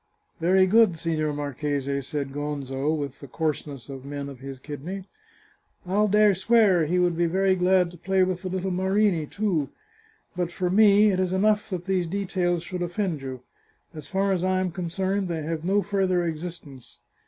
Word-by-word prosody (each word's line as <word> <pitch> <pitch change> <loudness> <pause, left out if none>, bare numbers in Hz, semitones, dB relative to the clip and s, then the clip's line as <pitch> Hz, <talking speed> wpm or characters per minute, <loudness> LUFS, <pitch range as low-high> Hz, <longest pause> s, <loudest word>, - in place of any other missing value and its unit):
" - - -33
Very 185 +3 +4
good, 205 -3 +4
Signor 155 -2 -1
Marchese," 140 -1 -2
said 140 0 -4
Gonzo, 145 -1 -2
with 140 -3 -5
the 140 - -10
coarseness 145 -2 -3
of 135 -2 -8
men 140 0 -5
of 135 -3 -10
his 135 0 -8
kidney. 155 +8 -6 0.4
" - - -37
I'll 205 +4 +2
dare 210 0 +5
swear 190 -4 +3
he 180 +3 +1
would 175 -1 +2
be 170 +1 +1
very 190 +3 +2
glad 180 -1 +3
to 175 - -14
play 190 +1 +2
with 185 -1 -1
the 185 - -4
little 190 +1 -2
Marini 190 -3 +1
too. 175 -9 -1 0.7
But 175 -1 -2
for 180 0 -2
me 210 +1 +6
it 185 - 0
is 185 -1 0
enough 210 +2 +2
that 180 -3 -4
these 185 -3 0
details 180 -2 -1
should 180 0 -5
offend 175 -3 -2
you. 130 -2 -6 0.5
As 155 -3 -9
far 195 +3 0
as 180 -2 0
I 185 0 +1
am 185 -1 -1
concerned, 185 +3 -2
they 165 -3 -3
have 160 0 -3
no 195 +3 +2
further 185 -2 +1
existence. 160 -5 -7
175 Hz, 190 wpm, -25 LUFS, 150-190 Hz, 0.7 s, me